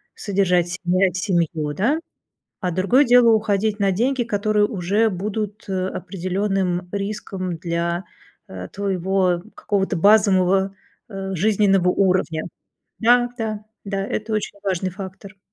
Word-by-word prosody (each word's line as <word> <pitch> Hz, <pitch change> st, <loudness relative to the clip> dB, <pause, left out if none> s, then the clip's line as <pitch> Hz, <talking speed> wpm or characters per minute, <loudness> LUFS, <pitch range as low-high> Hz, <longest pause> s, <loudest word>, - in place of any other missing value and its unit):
содержать 180 Hz, -4 st, +1 dB
себя 185 Hz, +1 st, +1 dB
и -, -, -12 dB
семью, 170 Hz, -6 st, -1 dB
да? 255 Hz, -, +1 dB, 0.6 s
А 180 Hz, -2 st, -1 dB
другое 200 Hz, -, +3 dB
дело- 240 Hz, -2 st, +6 dB
уходить 210 Hz, 0 st, 0 dB
на 195 Hz, -1 st, +3 dB
деньги, 245 Hz, +5 st, +1 dB
которые 210 Hz, -1 st, +1 dB
уже 205 Hz, +2 st, +1 dB
будут, 205 Hz, +2 st, -4 dB
э, 185 Hz, -1 st, -1 dB
определенным 185 Hz, 0 st, -2 dB
риском 195 Hz, -3 st, -4 dB
для, 170 Hz, +1 st, -2 dB, 0.4 s
э, 90 Hz, -1 st, -7 dB
твоего 190 Hz, -2 st, 0 dB
какого-то 195 Hz, -2 st, -1 dB
базового, 195 Hz, -1 st, +4 dB, 0.3 s
э, 195 Hz, -2 st, -5 dB
жизненного 195 Hz, -1 st, +3 dB
уровня. 180 Hz, -5 st, +1 dB, 0.6 s
Да, 240 Hz, +1 st, +4 dB
да, 215 Hz, -2 st, -3 dB, 0.2 s
да, 195 Hz, -1 st, -2 dB
это 215 Hz, +1 st, -3 dB
очень 210 Hz, -1 st, -2 dB
важный 185 Hz, -1 st, -1 dB
фактор. 195 Hz, +1 st, -9 dB
195 Hz, 125 wpm, -22 LUFS, 180-210 Hz, 0.6 s, дело